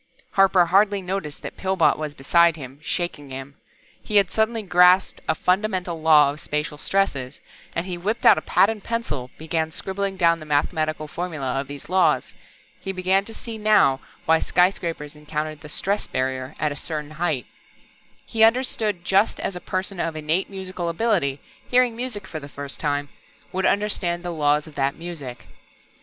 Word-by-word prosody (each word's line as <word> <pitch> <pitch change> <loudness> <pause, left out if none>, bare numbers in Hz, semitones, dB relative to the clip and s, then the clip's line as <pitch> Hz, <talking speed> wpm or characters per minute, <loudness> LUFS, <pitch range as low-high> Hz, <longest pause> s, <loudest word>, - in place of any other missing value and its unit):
Harper 195 -2 +5
hardly 200 +3 +3
noticed 180 -5 -5
that - - -7
Pillbot 190 -3 +2
was 150 -1 -5
beside 170 +4 +4
him, 135 -2 -10
shaking 155 -4 -3
him. 135 +1 -7 0.5
He 210 - -5
had 200 -3 +5
suddenly 220 0 +1
grasped 180 0 +4
a 160 - +3
fundamental 180 -2 0
law 150 -3 +6
of 145 - -10
spacial 150 0 -3
stresses, 145 -11 0 0.4
and 170 - -1
he 180 -2 -5
whipped 210 +6 -2
out - - +9
a - - -11
pad 200 - +3
and 215 -3 -8
pencil, 150 - -3
began 160 0 -2
scribbling 195 +3 -3
down 170 -2 +3
the 155 - -9
mathematical 155 +1 0
formula 150 -6 -3
of 140 - -9
these 140 0 -9
laws. 185 +2 +2 0.5
He 195 - -4
began 190 +1 +1
to 225 - -10
see 225 -2 -6
now 210 -11 +4 0.3
why 160 0 +4
skyscrapers 170 -5 0
encountered 150 0 -4
the 150 - -10
"stress 200 +6 0
barrier" 130 0 -2
at 150 - 0
a - - -4
certain 150 0 -5
height. 155 -6 -1 0.8
He 220 -1 +1
understood 225 -3 +3
it 175 - -26
just 195 +4 +2
as 195 - -3
a 180 - -6
person 185 0 -3
of 165 -1 -2
innate 155 +4 -1
musical 185 -3 -4
ability, 165 -8 0 0.3
hearing 245 -2 +3
music 230 -5 -4
for 160 - -6
the 140 -1 -10
first 140 0 -7
time, 145 -1 -1 0.4
would 190 +1 +1
understand 185 -4 0
the 175 - -2
laws 150 -1 +2
of 155 - -13
that 135 0 0
music. 155 -8 -8
170 Hz, 175 wpm, -23 LUFS, 150-195 Hz, 0.8 s, out